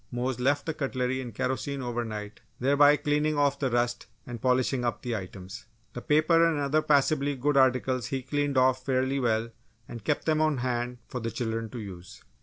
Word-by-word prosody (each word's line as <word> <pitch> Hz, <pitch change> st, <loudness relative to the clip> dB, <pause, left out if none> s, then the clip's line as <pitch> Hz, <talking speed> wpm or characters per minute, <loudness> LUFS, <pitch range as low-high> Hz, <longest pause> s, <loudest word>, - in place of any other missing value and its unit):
Mose 125 Hz, +1 st, -2 dB
left 140 Hz, +3 st, +1 dB
the 160 Hz, -, -2 dB
cutlery 130 Hz, -3 st, -2 dB
in 125 Hz, -2 st, -7 dB
kerosene 130 Hz, +3 st, -3 dB
over 120 Hz, -1 st, -2 dB
night 105 Hz, -2 st, -7 dB, 0.2 s
thereby 145 Hz, +3 st, +5 dB
cleaning 150 Hz, +1 st, 0 dB
off 140 Hz, -1 st, +2 dB
the 135 Hz, -, 0 dB
rust 120 Hz, 0 st, -1 dB, 0.2 s
and 120 Hz, -3 st, -7 dB
polishing 130 Hz, 0 st, +1 dB
up 120 Hz, -, -2 dB
the 120 Hz, -2 st, -2 dB
items. 95 Hz, +2 st, -8 dB, 0.3 s
The 120 Hz, -, -6 dB
paper 155 Hz, +5 st, +3 dB
and 165 Hz, -3 st, +2 dB
other 145 Hz, +2 st, +1 dB
passably 145 Hz, -1 st, +2 dB
good 145 Hz, +3 st, 0 dB
articles 130 Hz, -2 st, +2 dB
he 135 Hz, -1 st, -3 dB
cleaned 145 Hz, +1 st, -1 dB
off 130 Hz, 0 st, +3 dB
fairly 130 Hz, +1 st, 0 dB
well 115 Hz, -2 st, 0 dB, 0.4 s
and 115 Hz, -3 st, -9 dB
kept 145 Hz, -, -1 dB
them 155 Hz, -1 st, +2 dB
on 155 Hz, -2 st, +2 dB
hand 125 Hz, 0 st, -2 dB
for 125 Hz, -, -5 dB
the 115 Hz, -1 st, -3 dB
children 115 Hz, -2 st, -3 dB
to 120 Hz, -, -7 dB
use. 95 Hz, -4 st, -10 dB
130 Hz, 195 wpm, -28 LUFS, 120-145 Hz, 0.4 s, thereby